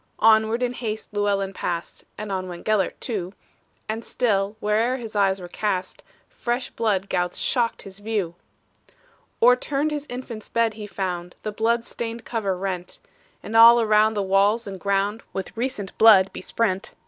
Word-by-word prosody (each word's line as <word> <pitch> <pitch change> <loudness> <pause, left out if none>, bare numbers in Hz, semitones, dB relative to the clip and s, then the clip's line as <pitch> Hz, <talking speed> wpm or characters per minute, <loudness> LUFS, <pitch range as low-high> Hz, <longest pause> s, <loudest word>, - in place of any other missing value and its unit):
Onward 220 +2 +4
in 245 0 0
haste 220 -3 -5
Llewellyn 200 -1 0
passed 170 -2 -4
(And 210 -1 -5
on 185 -1 -2
went 175 -1 -9
Gelert 215 -4 +1
too), 195 -6 -4 0.5
And 220 +1 -3
still, 205 -4 0
where'er 220 +5 +1
his 225 -4 -8
eyes 195 -1 +2
were 180 - -8
cast, 185 0 -3 0.3
Fresh 245 +1 -3
blood 200 -4 0
gouts 180 -2 -1
shocked 235 -2 0
his 195 0 -11
view! 205 -5 -2 1.1
O'erturned 275 +5 +3
his 295 -1 -4
infant's 245 -3 -7
bed 230 -1 +1
he 210 -1 -8
found, 180 -3 -4
The 215 - -3
blood 230 +2 0
stained 230 -1 -5
cover 200 -5 -2
rent; 180 -2 -4 0.4
And 225 - -6
all 230 +1 +9
around 215 -1 +3
the 205 - 0
walls 200 +4 +2
and 195 -2 -7
ground 200 +3 0
With 195 - -5
recent 230 -5 -3
blood 205 -4 +7
besprent. 195 +1 -2
215 Hz, 160 wpm, -24 LUFS, 195-230 Hz, 1.1 s, all